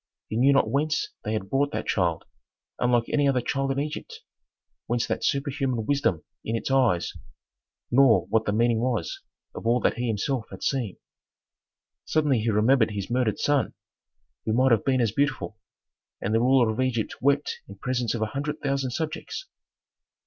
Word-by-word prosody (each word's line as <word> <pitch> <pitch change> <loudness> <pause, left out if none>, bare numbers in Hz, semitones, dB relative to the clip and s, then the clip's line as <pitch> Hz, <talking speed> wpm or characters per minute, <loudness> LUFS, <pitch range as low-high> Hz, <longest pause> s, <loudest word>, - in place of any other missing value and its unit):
He - - -3
knew 130 +5 +5
not 135 - +4
whence 150 +2 0
they 105 - -2
had 105 -3 -2
brought 140 +1 +2
that - - -2
child, 85 -5 0 0.5
unlike 120 -1 +2
any 145 -1 +2
other 130 -2 +2
child 135 +2 -1
in 135 - -1
Egypt, 150 +1 -5 0.7
whence 120 0 0
that - - -3
superhuman 135 -4 0
wisdom 140 - +1 0.2
in 115 - -2
its 115 - -2
eyes, 125 -10 +2 0.8
nor 120 -8 +5
what 110 0 +1
the - - +1
meaning 115 +1 +2
was 115 -8 -2 0.3
of - - -5
all 120 +2 +4
that - - +1
he 125 - -1
himself 115 +3 -1
had - - -9
seen. 125 -8 -1 1.1
Suddenly 150 -6 +2
he 110 +2 0
remembered 110 +3 +4
his 100 0 -5
murdered 120 -4 +1
son, 145 -2 +1 0.7
who 110 - 0
might 130 +2 +4
have 115 -3 +4
been 130 -2 +2
as 115 -3 +2
beautiful, 135 -4 -1 0.6
and 105 - -2
the 115 - +4
ruler 125 -1 +4
of 110 +4 -2
Egypt 120 -4 -1
wept 140 +2 +1
in 100 - -10
presence 120 +2 -1
of 110 - -1
a 110 - -4
hundred 150 +2 -3
thousand 135 -2 -1
subjects. 160 - -4
125 Hz, 175 wpm, -26 LUFS, 110-140 Hz, 1.1 s, knew